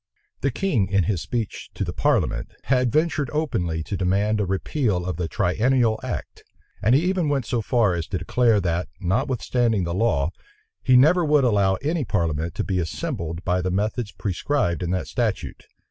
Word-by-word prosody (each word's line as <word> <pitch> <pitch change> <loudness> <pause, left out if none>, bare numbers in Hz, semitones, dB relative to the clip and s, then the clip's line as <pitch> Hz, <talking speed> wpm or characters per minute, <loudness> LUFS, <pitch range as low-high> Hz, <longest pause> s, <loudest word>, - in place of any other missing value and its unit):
The 140 - +1
king, 130 - 0
in 100 0 +2
his 90 -1 -1
speech 115 -4 -4
to - - -2
the - - -4
parliament, - - 0
had 125 -2 +2
ventured 155 -3 +1
openly 90 - -1
to 100 - -4
demand 100 +4 +1
a 100 - -1
repeal 95 - -1
of 90 -4 -3
the 90 -2 -2
triennial 110 - +1
act; - - -5 0.4
and 115 +5 +4
he 150 - +3
even 180 -4 +1
went 135 -4 0
so 120 - -1
far 110 -4 +2
as 85 -2 -3
to 95 - -2
declare 115 +4 +2
that, 85 0 -1
notwithstanding 120 0 0
the 85 0 -2
law, 85 -7 +1 0.5
he 130 -2 +5
never 165 +7 +5
would 150 -2 +3
allow 100 -5 +3
any 155 +1 0
parliament 85 - -1
to - - -1
be 95 -2 -1
assembled 85 0 -4
by 90 0 +1
the 95 - -1
methods 105 +3 -1
prescribed 95 - -1
in 90 - -2
that 90 0 -1
statute. 115 -5 -2
105 Hz, 180 wpm, -23 LUFS, 90-125 Hz, 0.5 s, he